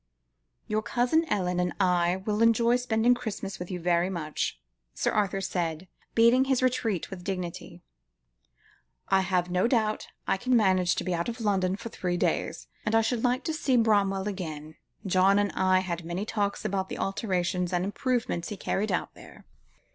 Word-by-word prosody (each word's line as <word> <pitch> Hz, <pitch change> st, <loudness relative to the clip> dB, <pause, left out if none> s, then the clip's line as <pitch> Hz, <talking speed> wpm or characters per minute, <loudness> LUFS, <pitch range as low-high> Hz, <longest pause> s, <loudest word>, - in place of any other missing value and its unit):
"Your 215 Hz, 0 st, 0 dB
cousin 250 Hz, +9 st, +1 dB
Ellen 180 Hz, -3 st, 0 dB
and 180 Hz, 0 st, 0 dB
I 180 Hz, 0 st, +2 dB
will 210 Hz, 0 st, 0 dB
enjoy 230 Hz, +1 st, +4 dB
spending 245 Hz, -1 st, +2 dB
Christmas 200 Hz, -5 st, -5 dB
with 180 Hz, -, -6 dB
you 180 Hz, -, -4 dB
very 175 Hz, +1 st, +1 dB
much," 160 Hz, -5 st, -3 dB, 0.4 s
Sir -, -, 0 dB
Arthur 195 Hz, -2 st, 0 dB
said, 175 Hz, -2 st, -2 dB, 0.3 s
beating 235 Hz, +3 st, +5 dB
his 265 Hz, -1 st, +1 dB
retreat 225 Hz, -9 st, 0 dB
with 180 Hz, -2 st, -7 dB
dignity. 180 Hz, -3 st, -5 dB, 1.3 s
"I 195 Hz, 0 st, +4 dB
have 180 Hz, -2 st, 0 dB
no 180 Hz, +5 st, +2 dB
doubt 220 Hz, -3 st, 0 dB, 0.2 s
I -, -, +2 dB
can 250 Hz, +4 st, +2 dB
manage 185 Hz, -4 st, +3 dB
to -, -, -2 dB
be 185 Hz, -, -1 dB
out 170 Hz, +5 st, -1 dB
of 235 Hz, +1 st, -6 dB
London 190 Hz, -4 st, +1 dB
for 230 Hz, -, -7 dB
three 180 Hz, -4 st, -2 dB
days, -, -, -1 dB, 0.2 s
and 215 Hz, -, 0 dB
I 225 Hz, -, +5 dB
should 225 Hz, +1 st, -1 dB
like 250 Hz, +2 st, +1 dB
to 320 Hz, -, -2 dB
see 275 Hz, -5 st, +1 dB
Bramwell 200 Hz, -3 st, +2 dB
again. 155 Hz, -6 st, -5 dB, 0.3 s
John 190 Hz, +1 st, +4 dB
and 205 Hz, -1 st, +1 dB
I 185 Hz, 0 st, +2 dB
had 175 Hz, -2 st, -4 dB
many 175 Hz, +5 st, -3 dB
talks 205 Hz, -2 st, -2 dB
about 190 Hz, -2 st, -1 dB
the -, -, -5 dB
alterations 185 Hz, -3 st, -1 dB
and 180 Hz, 0 st, 0 dB
improvements 230 Hz, -4 st, -1 dB
he 210 Hz, -, -5 dB
carried 205 Hz, +2 st, -1 dB
out 180 Hz, -, -2 dB
there." -, -, -15 dB
195 Hz, 175 wpm, -28 LUFS, 180-225 Hz, 1.3 s, beating